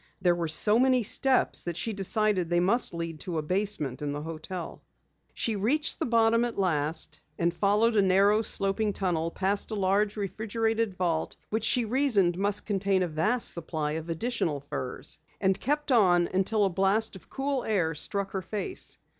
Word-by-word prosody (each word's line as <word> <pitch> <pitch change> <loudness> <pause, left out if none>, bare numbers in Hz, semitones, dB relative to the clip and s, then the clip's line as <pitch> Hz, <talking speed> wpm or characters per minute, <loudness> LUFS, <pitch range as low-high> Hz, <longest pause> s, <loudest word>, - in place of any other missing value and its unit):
There 180 -2 +3
were 170 -1 -2
so 210 +8 +4
many 255 -1 +3
steps 265 +5 +2
that 175 -1 -5
she 225 - -2
decided 195 -2 +1
they 175 0 +2
must 205 +8 +2
lead 165 -2 -5
to 170 0 -4
a 155 - -1
basement 180 -7 -2
in 145 -1 -2
the 145 +1 -5
hotel. 165 +2 -7 0.5
She 225 - -1
reached 275 +10 +1
the - - -1
bottom 230 0 +3
at 240 -1 -3
last 160 -4 -1 0.2
and 170 0 +1
followed 210 +5 +2
a 205 - +5
narrow 200 +3 +4
sloping 205 0 -1
tunnel, 170 -4 -1
past 195 +3 -1
a 220 - -3
large 200 +2 +1
refrigerated 220 +1 -1
vault 170 -3 -1 0.2
which 220 +1 -1
she 245 0 +2
reasoned 220 -8 +2
must 200 +2 0
contain 195 -2 +1
a - - -1
vast 210 +10 0
supply 160 -3 -3
of 160 +2 -5
additional 165 - -1
furs, 130 -1 -5 0.2
and 190 -1 +1
kept 295 +1 -1
on 180 -7 +4
until 200 +3 +2
a - - +2
blast 195 +4 +1
of 190 - -14
cool 270 -1 -2
air 180 -7 0
struck 195 +5 -2
her 190 - -3
face. 210 - -5
195 Hz, 180 wpm, -28 LUFS, 175-220 Hz, 0.5 s, a